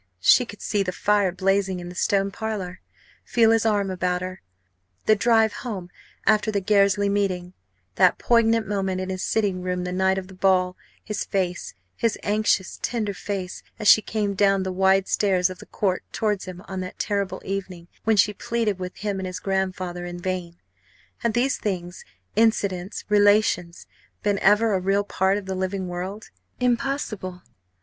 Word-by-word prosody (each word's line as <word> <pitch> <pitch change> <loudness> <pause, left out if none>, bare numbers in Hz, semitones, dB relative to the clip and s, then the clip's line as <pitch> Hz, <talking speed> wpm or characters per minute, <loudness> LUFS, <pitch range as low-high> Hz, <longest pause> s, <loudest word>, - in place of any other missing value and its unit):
she 240 - +5
could 205 - -10
see 205 -2 0
the 185 -2 -1
fire 205 0 +2
blazing 190 0 0
in 175 - -7
the - - -8
Stone 195 +1 +1
Parlour, 195 -4 -5 0.4
feel 225 -2 +3
his 225 0 +3
arm 200 -3 +1
about 180 0 -1
her! 185 0 -6 0.6
the 215 - +5
drive 225 0 +3
home 190 -8 -6 0.3
after 215 0 +3
the 205 - +1
Gairsley 200 0 +3
meeting 190 -3 -1 0.4
that - - +5
poignant 230 -1 +3
moment 195 -2 -1
in 185 0 -3
his 185 0 -4
sitting 200 -4 0
room 180 0 -2
the 180 - -3
night 190 +1 +2
of 190 -1 -4
the 190 - -13
ball 185 -1 +2 0.3
his 210 -2 -3
face, 180 - -2 0.2
his 230 -3 0
anxious, 205 -3 +1
tender 215 -4 -1
face, 190 -1 -5 0.2
as 215 - -2
she 215 - +8
came 210 -2 -2
down 195 -1 +3
the 190 - -3
wide 190 +1 +3
stairs 185 -3 +2
of 185 - -10
the - - -12
Court 190 -3 -1
towards 210 -3 -1
him 185 0 -9
on 190 -1 -5
that 185 0 -6
terrible 200 -2 -1
evening 185 -3 -5 0.2
when 220 -1 +2
she 205 +2 +4
pleaded 220 -2 -1
with 180 0 -5
him 205 -1 -3
and 190 - -3
his 185 0 -5
grandfather 185 -2 -2
in 175 0 -6
vain: 180 -1 -3 0.6
had 235 -2 -1
these 260 +3 +2
things, 180 -3 -4 0.3
incidents, 200 -4 +1
relations, 205 -4 +3 0.4
been 205 -1 +1
ever 210 +2 +4
a 190 - +2
real 195 +2 +1
part 190 0 +1
of 205 - -6
the 190 - -3
living 190 0 -2
world? 185 +4 -6 0.3
Impossible! 240 -8 -1
195 Hz, 175 wpm, -24 LUFS, 185-210 Hz, 0.6 s, she